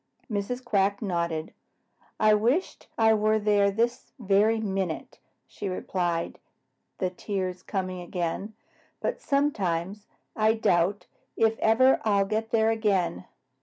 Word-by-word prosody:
Mrs. 230 Hz, +5 st, -3 dB
Quack 200 Hz, -3 st, +1 dB
nodded. 170 Hz, -5 st, -2 dB, 0.7 s
"I 215 Hz, 0 st, +5 dB
wish 240 Hz, -, +1 dB, 0.2 s
I 220 Hz, -1 st, +5 dB
were 215 Hz, 0 st, +2 dB
there 205 Hz, -1 st, +3 dB
this 235 Hz, +4 st, -2 dB
very 215 Hz, +1 st, +2 dB
minute," 190 Hz, -6 st, -3 dB, 0.3 s
she 200 Hz, -, -6 dB
replied, 175 Hz, -2 st, -2 dB, 0.6 s
the 185 Hz, -2 st, -1 dB
tears 185 Hz, -1 st, -4 dB
coming 185 Hz, -2 st, -4 dB
again. 175 Hz, +4 st, -4 dB, 0.4 s
"But -, -, -3 dB
sometimes 205 Hz, -, -1 dB, 0.3 s
I 220 Hz, 0 st, +3 dB
doubt 190 Hz, -2 st, +1 dB, 0.3 s
if 225 Hz, 0 st, +3 dB
ever 255 Hz, +4 st, +4 dB
I'll 200 Hz, -2 st, +2 dB
get 220 Hz, +2 st, -2 dB
there 225 Hz, -1 st, +3 dB
again. 195 Hz, -, 0 dB
205 Hz, 120 wpm, -27 LUFS, 185-220 Hz, 0.7 s, I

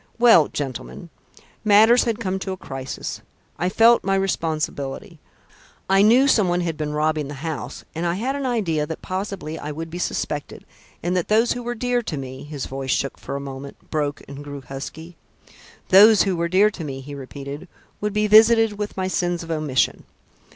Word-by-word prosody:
"Well, 230 Hz, -10 st, +6 dB
gentlemen, 145 Hz, +4 st, -6 dB, 0.5 s
matters 220 Hz, +3 st, +6 dB
had 230 Hz, -3 st, 0 dB
come 190 Hz, -3 st, -2 dB
to 190 Hz, -, -4 dB
a -, -, -7 dB
crisis. 135 Hz, -5 st, -6 dB, 0.4 s
I 175 Hz, +3 st, +1 dB
felt 230 Hz, +4 st, +5 dB
my 195 Hz, 0 st, +1 dB
responsibility. 160 Hz, -5 st, -2 dB, 0.7 s
I 195 Hz, +1 st, +4 dB
knew 240 Hz, +6 st, +5 dB
somebody 180 Hz, -8 st, +2 dB
had 165 Hz, -2 st, -2 dB
been 150 Hz, -1 st, -3 dB
robbing 155 Hz, -1 st, 0 dB
the 145 Hz, -, -7 dB
house 145 Hz, -4 st, -6 dB
and 165 Hz, -, -4 dB
I 170 Hz, 0 st, 0 dB
had 255 Hz, +8 st, -2 dB
an 280 Hz, -2 st, -2 dB
idea 165 Hz, -11 st, 0 dB
that 160 Hz, -, -7 dB
possibly 185 Hz, -4 st, -4 dB
I 150 Hz, -, -5 dB
would 165 Hz, +2 st, -6 dB
be 175 Hz, -, -5 dB
suspected, 150 Hz, -4 st, -3 dB, 0.4 s
and 175 Hz, +2 st, 0 dB
that 180 Hz, -, 0 dB
those 225 Hz, +3 st, +3 dB
who 245 Hz, -, -2 dB
were 240 Hz, 0 st, -4 dB
dear 245 Hz, +1 st, 0 dB
to 160 Hz, -9 st, -5 dB
me" 130 Hz, -1 st, -7 dB
his 145 Hz, -2 st, -6 dB
voice 135 Hz, 0 st, -6 dB
shook 135 Hz, +1 st, -1 dB
for 140 Hz, -, -6 dB
a -, -, -2 dB
moment, 140 Hz, 0 st, -9 dB
broke, 150 Hz, -2 st, -2 dB
and 140 Hz, +1 st, -9 dB
grew 145 Hz, -1 st, -8 dB
husky 150 Hz, +6 st, -8 dB, 0.7 s
"those 210 Hz, +3 st, +8 dB
who 195 Hz, -2 st, 0 dB
were 170 Hz, 0 st, -1 dB
dear 200 Hz, +4 st, +4 dB
to 175 Hz, -, -7 dB
me," 135 Hz, -3 st, -5 dB
he 145 Hz, +2 st, -9 dB
repeated, 140 Hz, +4 st, -8 dB, 0.3 s
"would 210 Hz, 0 st, -1 dB
be 210 Hz, 0 st, +1 dB
visited 220 Hz, 0 st, +5 dB
with 210 Hz, -1 st, -4 dB
my 185 Hz, 0 st, -1 dB
sins 175 Hz, -1 st, -1 dB
of 165 Hz, -, -7 dB
omission. 155 Hz, -4 st, 0 dB
170 Hz, 190 wpm, -22 LUFS, 145-210 Hz, 0.7 s, those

